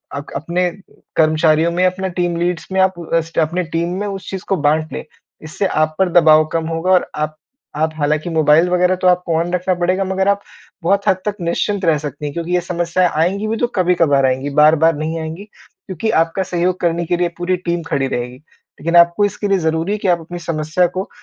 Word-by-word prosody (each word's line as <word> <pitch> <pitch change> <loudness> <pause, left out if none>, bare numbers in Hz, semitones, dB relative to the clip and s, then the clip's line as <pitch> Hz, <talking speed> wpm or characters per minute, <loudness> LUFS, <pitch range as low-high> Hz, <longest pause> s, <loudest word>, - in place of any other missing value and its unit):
अक 145 +1 -7
अपने 175 +3 -1 0.5
कर्मचारियों 155 +1 +3
में, 180 +2 +1
अपना 185 +1 -1
टीम 175 -1 0
लीड्स 175 -1 -2
में, 190 - 0
आप 190 -2 +1
अस्ट 165 0 -1
अपने 170 +3 0
टीम 170 +2 -3
में 205 - -2
उस 195 -1 -6
चीज़ 190 -1 -5
को 195 - +1
बाँट 155 +1 0
लें। - - -5 0.4
इससे 155 +6 -3
आप 155 -1 0
पर 190 -1 +3
दबाव 155 -1 +5
कम 165 -1 -1
होगा 165 +3 -1
और 185 -1 +3
आप 155 0 -3 0.4
आप 155 +1 0
हालाँकि 150 +3 0
मोबाइल 160 +1 +4
वगैरह 180 +1 +2
तो 185 0 0
आपको 180 -2 +2
ऑन 170 +2 -1
रखना 180 +1 0
पड़ेगा, 180 +2 0
मगर 190 +1 -1
आप 200 0 +2 0.4
बहुत 200 +4 +1
हद 190 - +4
तक 210 -1 -1
निश्चिंत 185 +3 -1
रह 160 -2 +3
सकती 145 0 -6
हैं 145 - -4
क्योंकि 170 +2 -4
ये 180 - +2
समस्याएँ 175 0 0
आएँगी 185 +7 0
भी, 225 +1 -1
तो 240 - +1
कभी-कभार 170 -7 +3
आएँगी, 130 +2 0
बार-बार 155 +2 +4
नहीं 160 +2 -3
आएँगी, 160 +4 -6 0.4
क्योंकि 190 +4 -3
आपका 165 +3 -1
सहयोग 180 0 -1
करने 170 0 0
के 175 +2 0
लिए 175 0 0
पूरी 180 +1 -1
टीम 175 -1 -2
खड़ी 135 -1 0
रहेगी। 125 -1 -4
लेकिन 165 +3 -7
आपको 170 +4 +5
इसके 205 +1 -3
लिए 195 -1 +2
ज़रूरी 160 +2 -1
है 210 - 0
कि 200 - -2
आप 175 -2 +3
अपनी 175 +2 -8
समस्या 165 +1 0
को 190 +2 -4
170 Hz, 215 wpm, -18 LUFS, 155-185 Hz, 0.5 s, दबाव